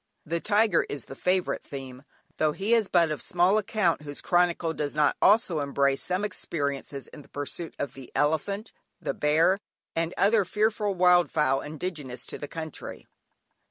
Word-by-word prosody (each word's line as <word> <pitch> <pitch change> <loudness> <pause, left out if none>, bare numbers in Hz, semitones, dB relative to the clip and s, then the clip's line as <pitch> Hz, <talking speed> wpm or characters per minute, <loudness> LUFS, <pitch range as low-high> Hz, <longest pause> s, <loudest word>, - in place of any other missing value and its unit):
The 170 +2 -1
tiger 210 -1 +3
is 145 -4 -5
the - - -9
favourite 180 +4 0
theme, 130 -2 -8 0.4
though 155 -1 +2
he 200 +7 0
is 225 -4 +3
but 170 -4 +3
of 150 - -3
small 180 +4 +3
account 210 -5 +1
whose 145 -1 -7
chronicle 175 -2 +2
does 150 -2 -3
not 150 -1 +3
also 195 -5 +4
embrace 140 -1 +1
some 185 +3 -1
experiences 140 -7 -4
in 150 - -11
the - - -19
pursuit 145 +3 -5
of 140 -3 -3
the 135 -2 -11
elephant, 180 +9 0 0.3
the 170 - -2
bear 160 +6 +3 0.4
and 165 0 0
other 210 +1 +4
fearful 210 +1 0
wildfowl 170 -6 +3
indigenous 150 -5 -5
to - - -7
the 145 - -5
country. 160 -1 -7
165 Hz, 160 wpm, -27 LUFS, 145-190 Hz, 0.4 s, also